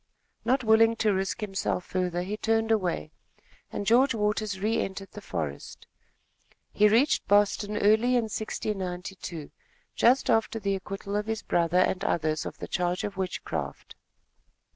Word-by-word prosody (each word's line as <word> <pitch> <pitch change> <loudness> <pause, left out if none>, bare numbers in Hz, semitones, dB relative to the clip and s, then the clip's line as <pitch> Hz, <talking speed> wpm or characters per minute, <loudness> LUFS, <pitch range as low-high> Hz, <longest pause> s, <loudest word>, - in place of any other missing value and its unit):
Not 255 +3 +1
willing 225 0 +5
to 215 -2 +2
risk 190 +3 -2
himself 195 -3 -2
further 180 -1 -1
he 200 +3 -3
turned 225 +1 0
away, 180 -7 0 0.6
and 205 - -4
George 245 +4 +4
Waters 210 -2 -1
re 215 +3 +1
entered 195 0 -5
the 210 - -9
forest. 75 - -5 0.9
He 210 - +5
reached 235 +8 +3
Boston 205 +1 +2
early 220 +5 +4
in 240 - +3
1692, 185 -6 -5 0.4
just 255 +3 +3
after 225 -1 +2
the 200 -1 -1
acquittal 195 +1 -5
of 210 +1 -1
his 220 -1 -3
brother 170 0 +1
and 185 0 +2
others 155 -1 0
of - - -8
the - - -7
charge 180 0 -1
of 205 -1 -4
witchcraft. 190 -1 -4
205 Hz, 145 wpm, -27 LUFS, 185-220 Hz, 0.9 s, willing